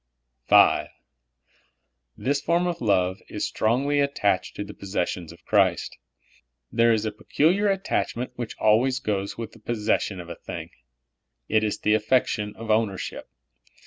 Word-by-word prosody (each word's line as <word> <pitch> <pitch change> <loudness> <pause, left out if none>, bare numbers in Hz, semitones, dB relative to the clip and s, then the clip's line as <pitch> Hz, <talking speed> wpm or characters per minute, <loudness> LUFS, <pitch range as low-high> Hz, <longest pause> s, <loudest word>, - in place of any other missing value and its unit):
V. - - +6 1.3
This 140 +2 0
form 170 +3 +1
of 175 -1 -2
love 95 -4 +1
is - - -2
stroiigly 135 +6 +1
attached 105 -9 0
to 105 - -3
the 105 0 -9
possessions 90 -3 -3
of 85 0 -17
Christ. 95 -5 +1 0.7
There 115 0 +4
is 110 -1 +1
a 110 - -1
peculiar 175 - +1
attachment 185 -10 -2
w^hich 120 -2 -5
always 120 +5 +3
goes 100 -5 -2
with 115 -1 -5
the 115 - -17
possession 105 -3 -1
of 85 - -8
a 85 - -5
thing. - - -8 0.8
It 110 0 +2
is 105 - -1
the 105 - +3
affection 110 -1 +1
of 115 -1 -4
ownership. 110 -3 -1
110 Hz, 145 wpm, -25 LUFS, 100-125 Hz, 1.3 s, V